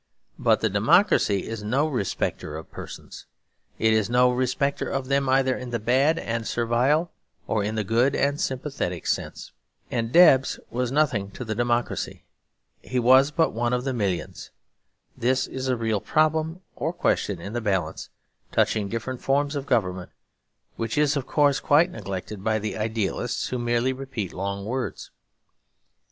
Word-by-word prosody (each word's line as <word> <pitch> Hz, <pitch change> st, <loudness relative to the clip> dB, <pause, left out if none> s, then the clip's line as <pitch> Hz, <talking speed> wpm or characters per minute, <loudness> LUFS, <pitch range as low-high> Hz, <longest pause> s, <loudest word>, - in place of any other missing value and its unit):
But -, -, +3 dB
democracy 110 Hz, -, +3 dB
is 115 Hz, -1 st, -5 dB
no 130 Hz, +9 st, +1 dB
respecter 100 Hz, -, -2 dB
of 80 Hz, -, -10 dB
persons. -, -, -10 dB, 0.5 s
It 110 Hz, 0 st, +3 dB
is 110 Hz, -1 st, +1 dB
no 125 Hz, +1 st, +4 dB
respecter 130 Hz, +3 st, -1 dB
of 135 Hz, -1 st, -3 dB
them, 140 Hz, -1 st, +1 dB
either 130 Hz, -1 st, +3 dB
in 125 Hz, -1 st, -6 dB
the 120 Hz, -, -1 dB
bad 130 Hz, +8 st, +2 dB
and 115 Hz, -4 st, -3 dB
servile 125 Hz, +8 st, +1 dB, 0.3 s
or 110 Hz, -2 st, 0 dB
in 105 Hz, +2 st, -2 dB
the 110 Hz, -, 0 dB
good 120 Hz, +6 st, +2 dB
and 145 Hz, +1 st, 0 dB
sympathetic 130 Hz, -, -3 dB
sense. -, -, -3 dB, 0.4 s
And 115 Hz, -2 st, -1 dB
Debs 135 Hz, -6 st, +6 dB
was 125 Hz, 0 st, -1 dB
nothing 130 Hz, -9 st, +1 dB
to 125 Hz, -, -6 dB
democracy. 120 Hz, +1 st, -1 dB, 0.6 s
He 130 Hz, -, -4 dB
was 130 Hz, +3 st, +6 dB
but 165 Hz, +2 st, +1 dB
one 120 Hz, +2 st, 0 dB
of 125 Hz, 0 st, 0 dB
the 135 Hz, 0 st, -2 dB
millions. 100 Hz, -7 st, -3 dB, 0.7 s
This 130 Hz, +2 st, +1 dB
is 130 Hz, 0 st, -5 dB
a 130 Hz, -1 st, +1 dB
real 110 Hz, -3 st, -1 dB
problem, 160 Hz, +2 st, +1 dB
or 160 Hz, +4 st, -2 dB
question 100 Hz, -, 0 dB
in 100 Hz, +5 st, -7 dB
the 120 Hz, -, -2 dB
balance, 100 Hz, -4 st, -2 dB, 0.4 s
touching 105 Hz, -2 st, +1 dB
different 120 Hz, +3 st, -4 dB
forms 140 Hz, +2 st, +1 dB
of 140 Hz, -1 st, -4 dB
government; 95 Hz, -6 st, 0 dB, 0.7 s
which 115 Hz, +2 st, -3 dB
is, 150 Hz, 0 st, +3 dB
of 135 Hz, -3 st, -3 dB
course, 145 Hz, -2 st, +3 dB
quite 160 Hz, +5 st, +3 dB
neglected 100 Hz, -, -6 dB
by 110 Hz, 0 st, +1 dB
the 110 Hz, 0 st, -3 dB
idealists 110 Hz, +2 st, -2 dB
who 125 Hz, -, -2 dB
merely 120 Hz, +2 st, +1 dB
repeat 130 Hz, -8 st, -5 dB
long 100 Hz, +1 st, -4 dB
words. 120 Hz, -3 st, -4 dB
125 Hz, 155 wpm, -25 LUFS, 110-135 Hz, 0.7 s, Debs